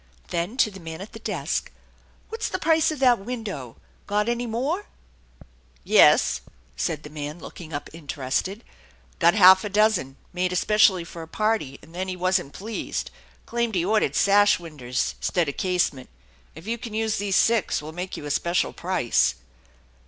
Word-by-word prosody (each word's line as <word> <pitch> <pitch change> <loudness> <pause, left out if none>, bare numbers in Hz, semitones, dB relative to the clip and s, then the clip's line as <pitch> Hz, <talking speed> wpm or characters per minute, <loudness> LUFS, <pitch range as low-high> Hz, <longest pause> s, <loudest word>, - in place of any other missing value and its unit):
Then 175 +8 -2
to 215 - +3
the 195 - -11
man 160 -1 -8
at 200 +4 -9
the 225 - -9
desk: - - -3 0.3
" - - -33
What's 445 0 -3
the - - -2
price 320 -1 +3
of 310 - -3
that 245 -4 +5
window 195 - -6
f - - -32
Got 210 +2 +1
any 240 0 -1
more? 275 - -2 0.3
" - - -24
" - - -33
Yes," - - +5 0.3
said 155 - -2
the 150 - -9
man, 150 +1 -5
looking 165 0 -10
up 145 -1 -4
interested; 160 - -3 0.3
" - - -31
got 170 +2 +5
half 190 -2 +8
a 210 - -3
dozen, 200 -10 +2 0.2
made 180 0 0
especially 190 -1 +3
for 170 0 -9
a 160 - -8
party, 215 -8 -1
and 165 - -16
then 185 +2 -3
he 185 - -3
wasn't 180 -4 0
pleased. 220 +3 -4 0.3
Claimed 235 -2 -1
he 175 -1 +1
ordered 215 +2 +1
sash 205 +1 +5
winders 140 -8 -3
'stead 175 -3 +1
of 145 - -4
casement. 180 -8 0 0.5
If 160 +3 -11
you 230 +2 -3
can 225 -2 -7
use 220 0 0
these 200 -2 0
six, 225 -2 +3
we'll 150 +1 -8
make 180 +3 -5
you - - -8
a 145 - -3
special 170 +4 0
price." 175 -10 +1
185 Hz, 185 wpm, -24 LUFS, 160-220 Hz, 0.5 s, half